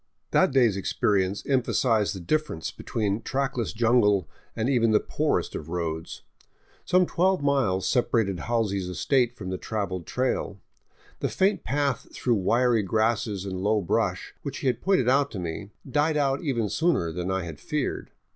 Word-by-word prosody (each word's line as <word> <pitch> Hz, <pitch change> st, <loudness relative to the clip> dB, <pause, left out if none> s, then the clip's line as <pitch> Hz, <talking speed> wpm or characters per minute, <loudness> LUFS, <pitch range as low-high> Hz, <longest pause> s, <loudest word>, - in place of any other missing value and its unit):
That -, -, +4 dB
day's 120 Hz, -7 st, +3 dB
experience 95 Hz, 0 st, 0 dB
emphasized 120 Hz, -5 st, +1 dB
the -, -, -6 dB
difference 150 Hz, -, -2 dB
between 105 Hz, -1 st, -2 dB
trackless 135 Hz, -3 st, -2 dB
jungle 110 Hz, -6 st, +3 dB, 0.3 s
and 115 Hz, +1 st, -1 dB
even 120 Hz, -4 st, +3 dB
the 110 Hz, -1 st, +4 dB
poorest -, -, -1 dB
of 75 Hz, -, -6 dB
roads. 80 Hz, -2 st, -4 dB, 0.6 s
Some 180 Hz, 0 st, +4 dB
twelve 185 Hz, -1 st, +1 dB
miles 130 Hz, -10 st, +1 dB
separated 115 Hz, -7 st, +1 dB
Halsey's 105 Hz, -6 st, -1 dB
estate 125 Hz, +6 st, +1 dB
from 95 Hz, -3 st, -6 dB
the 95 Hz, -, -3 dB
traveled 100 Hz, -5 st, -3 dB
trail. 125 Hz, -6 st, -1 dB, 0.6 s
The -, -, -1 dB
faint 190 Hz, -1 st, +1 dB
path 140 Hz, -2 st, -1 dB
through 125 Hz, -, +1 dB
wiry 115 Hz, +3 st, +2 dB
grasses 110 Hz, 0 st, 0 dB
and 95 Hz, -1 st, -4 dB
low 105 Hz, +2 st, +2 dB
brush, 90 Hz, -, -1 dB
which -, -, -5 dB
he -, -, -5 dB
had 130 Hz, -, +1 dB
pointed 190 Hz, -11 st, +2 dB
out 140 Hz, +2 st, +3 dB
to 100 Hz, -, -4 dB
me, 90 Hz, +4 st, -5 dB, 0.2 s
died 150 Hz, +4 st, +1 dB
out 140 Hz, -1 st, +1 dB
even 120 Hz, -9 st, 0 dB
sooner 160 Hz, -, +1 dB
than 90 Hz, +2 st, -4 dB
I 95 Hz, -1 st, -1 dB
had 80 Hz, -4 st, -8 dB
feared. 150 Hz, -3 st, -3 dB
115 Hz, 160 wpm, -26 LUFS, 95-135 Hz, 0.6 s, That